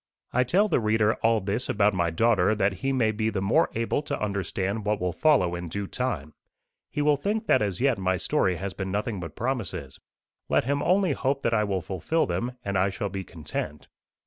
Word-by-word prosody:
I 125 - +4
tell 185 - +3
the 175 - +2
reader 110 -1 +2
all 115 -1 +3
this 100 +6 -2
about 105 -1 +3
my 85 -2 +1
daughter 105 +2 +3
that 100 -1 +1
he 135 - +1
may 120 -5 +2
be 110 +1 -1
the 105 - -2
more 110 - +3
able 115 +5 0
to 145 -1 -4
understand 100 +1 -2
what 105 0 0
will 90 -1 -1
follow 130 - +3
in 85 -1 -5
due 100 +4 -3
time. 95 - -3 0.6
He 145 - -1
will 150 -1 +4
think 215 +9 -1
that - - +4
as 100 -4 -1
yet 130 -5 +2
my 95 0 +1
story 90 +1 +1
has 95 +2 -4
been 95 -1 -4
nothing 105 +1 -2
but 85 -3 -7
promises. 100 - -3 0.5
Let - - +3
him 140 +3 0
only 185 +1 +3
hope 140 0 -1
that 115 - +1
I 105 -1 +3
will 95 -3 -2
fulfil 95 - 0
them, 95 +9 -2
and 100 -2 0
I 95 +1 +3
shall 100 +1 -3
be 95 0 -4
content. 80 -3 -6
105 Hz, 215 wpm, -26 LUFS, 95-125 Hz, 0.6 s, I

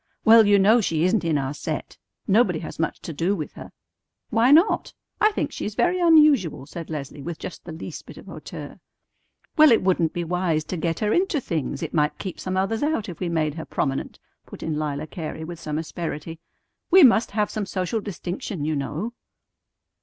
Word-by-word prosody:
"Well, 225 -1 +8
you 205 0 +6
know 215 +5 +5
she 160 -5 0
isn't 185 +3 +2
in 160 -3 +1
our 135 0 -2
set. - - -5 0.3
Nobody 195 -4 +3
has - - -8
much 165 - -1
to 165 - -6
do 170 +7 0
with 155 -6 -6
her." - - -10 0.6
"Why 230 +2 +4
not? 325 +9 +4 0.2
I 430 - +4
think - - -2
she - - -6
is 210 - -4
very 360 +6 +2
unusual," 300 - +4
said 165 +2 -8
Leslie 145 -2 -6
with 165 +2 -5
just 175 - -8
the 170 - -7
least 160 - -8
bit - - -11
of - - -12
hauteur. - - -9 0.8
"Well, 305 -3 +8
it 230 - +4
wouldn't 175 -4 +2
be 175 -1 -3
wise 170 -2 0
to 180 - -5
get 165 0 -2
her 210 0 +1
into 360 -4 +1
things. 165 - -3
It 160 - -5
might 150 -1 +1
keep 190 -3 -6
some 185 0 -3
others 195 +4 0
out 290 -9 -1
if 175 - -8
we 180 - -2
made 155 -3 0
her 160 +1 -6
prominent," 135 -1 -2 0.3
put - - -10
in 155 -2 -2
Lila 150 0 -3
Cary 160 0 -6
with 170 0 -7
some 150 -2 -4
asperity. 160 0 -5 0.5
"We 370 0 +8
must 235 -3 +5
have 210 -1 +1
some 210 -2 -3
social 185 +4 -2
distinction, 185 -4 -5
you 155 0 0
know." 155 - -3
175 Hz, 205 wpm, -24 LUFS, 160-220 Hz, 0.8 s, Well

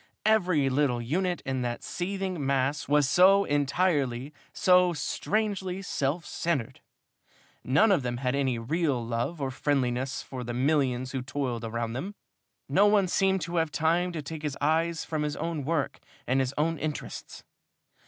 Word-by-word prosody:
Every 180 -10 +3
little 135 -2 +1
unit 175 +9 -1
in 130 -1 -1
that 120 -1 -3
seething 185 -3 -3
mass 135 +1 0
was 145 -1 +3
so 190 +6 +6
entirely, 145 -3 0 0.2
so 180 -1 +4
strangely 195 +1 -2
self 150 0 -1
centered. 165 -9 -2 0.8
None 145 - +4
of 185 - +3
them 120 -1 -3
had 125 0 -1
any 135 -3 0
real 135 0 -1
love 120 +8 -2
or 135 -2 -2
friendliness 130 -1 -1
for 130 -2 -7
the 120 0 -4
millions 130 -2 +1
who 130 - -3
toiled 125 -3 -3
around 115 0 -3
them, 185 +12 -5 0.5
no 205 - +4
one 205 -2 +4
seemed 190 +1 +2
to 170 +2 -3
have 165 -1 +2
time 170 +4 +1
to 155 -3 -4
take 155 +2 -6
his 150 -3 -3
eyes 165 +3 +1
from 155 -2 -2
his 150 -1 -2
own 165 -4 -3
work 155 -2 -1 0.3
and 130 +2 +1
his 135 +1 -1
own 160 +1 0
interests. 150 -1 -5
145 Hz, 160 wpm, -28 LUFS, 130-175 Hz, 0.8 s, so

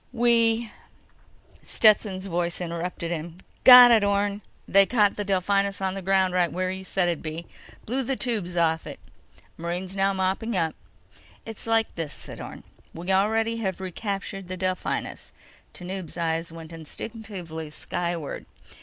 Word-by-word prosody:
"We—" 230 -2 +2 0.9
Stetson's 205 -3 +3
voice 175 -2 -2
interrupted 170 0 -4
him: 165 0 -5 0.3
"Got 250 -1 +11
it, 225 -3 +5
Orne! 200 0 +1 0.3
They 195 0 +5
caught 210 -5 +3
the 205 - -2
Delphinus 200 +1 +1
on 190 -1 -1
the 195 - -5
ground 190 0 +2
right 180 -2 +2
where 185 +1 -1
you 190 0 -5
said 190 -1 0
it'd 170 -2 -1
be! 160 +2 -6 0.4
Blew 255 +4 -1
the 265 +1 -1
tubes 210 -9 -2
off 160 -1 +1
it. - - -8 0.6
Marines 180 +3 -4
now 195 0 +2
mopping 190 +3 -1
up." 160 -2 0 0.7
"It's 225 0 -9
like 225 -1 +1
this," 165 -4 -5
said - - -10
Orne. - - -9 0.3
"We 175 +3 -3
already 220 +4 +2
have 190 -5 -3
recaptured 195 0 -5
the 185 0 -5
Delphinus." 185 0 -3 0.4
Tanub's 180 -2 -7
eyes 165 0 -1
went 165 0 -10
instinctively 165 -1 -7
skyward. 170 0 -4
190 Hz, 145 wpm, -25 LUFS, 170-210 Hz, 0.9 s, Got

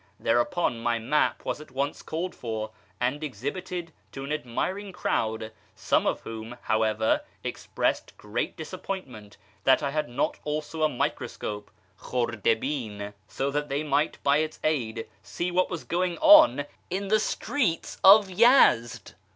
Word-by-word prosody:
Thereupon 120 +1 +1
rny 120 -1 +1
map 140 +7 0
was - - -3
at 150 - -12
once 140 +2 -2
called 170 +3 -4
for 110 -2 -4 0.3
and 130 +5 -1
exhibited 165 - -5 0.2
to 135 - -6
an 140 - -5
admiring 180 - -3
crowd, 110 -10 -1 0.2
some - - +1
of - - 0
whom, 115 +2 -7
however, 110 0 +1 0.2
expressed - - -2
great 105 +3 -3
disappointment 155 - -7 0.3
that 135 +3 +4
I 140 - 0
had 150 -1 -1
not 125 +4 -1
also 155 +1 -3
a 155 - +4
microscope 105 -5 -3 0.3
{khmxU 115 0 -1
Mn), 100 0 -6
so 135 +4 -2
that 145 +1 -2
they 140 +2 -1
might 150 0 +1
by 140 +1 +4
its 155 0 -2
aid 120 -8 -1
see 180 +1 -3
what 185 +1 +2
was 175 -3 -5
going 175 0 -1
on 310 - +7 0.2
in 195 +2 -3
the 215 +1 +4
streets 215 - -1
of 200 +1 +9
Yezd 190 - +4
145 Hz, 145 wpm, -27 LUFS, 115-175 Hz, 0.3 s, of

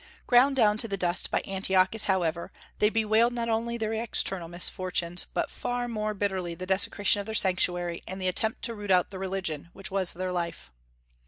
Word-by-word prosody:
Ground 260 +3 +5
down 215 -4 +3
to 230 - +2
the 195 -2 -2
dust 180 -1 -1
by - - 0
Antiochus, 190 +2 +2
however, 170 -3 0 0.3
they 210 - +4
bewailed 225 +2 +2
not 235 -1 -2
only 230 +1 -1
their 220 -1 -2
external 195 -5 -1
misfortunes, 175 0 -1
but - - -1
far 245 0 -3
more 215 -2 -2
bitterly 190 -4 -2
the 185 - -6
desecration 195 +1 +2
of 200 - -5
their 220 - -3
Sanctuary 175 -3 +1
and 190 +1 -6
the 185 - -1
attempt 220 +4 -1
to 230 - +1
root 205 -2 -8
out 180 -1 +3
their 190 - -7
religion, 185 -5 -3
which 195 0 -4
was 190 -2 0
their 185 +1 -3
life. 170 - -4
195 Hz, 190 wpm, -28 LUFS, 180-220 Hz, 0.3 s, Ground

